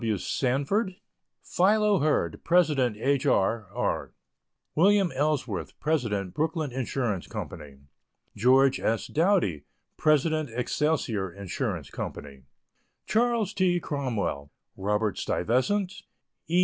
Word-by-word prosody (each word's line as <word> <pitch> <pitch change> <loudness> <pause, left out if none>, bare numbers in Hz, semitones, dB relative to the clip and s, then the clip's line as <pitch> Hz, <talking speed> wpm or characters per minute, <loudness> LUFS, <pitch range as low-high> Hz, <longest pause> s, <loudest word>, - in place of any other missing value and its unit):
W. 110 -3 0
Sanford, 140 - 0 0.5
Philo 210 +1 +3
Hurd, 155 +1 0
President 150 -10 +2
H. 140 +5 +1
R. 110 -2 +2
R.; 125 +4 -2 0.6
Wm. 195 +2 +4
Ellsworth, 130 - -2
President 110 - -1
Brooklyn 160 -2 -1
Ins. 130 -1 -3 0.4
Co.; - - -5 0.9
George 130 +4 +4
S. 115 0 0
Doughty, 160 - +1 0.3
President 155 -1 +2
Excelsior 125 - 0
Ins. 100 -2 -4
Co.; 70 -2 -7 0.7
Chas. 230 -2 +1
T. 185 -3 +2
Cromwell, 120 - -3 0.3
Robert 105 +1 -1
Stuyvesant, 180 - 0 0.5
E. 170 +3 +2
140 Hz, 95 wpm, -27 LUFS, 110-175 Hz, 0.9 s, Wm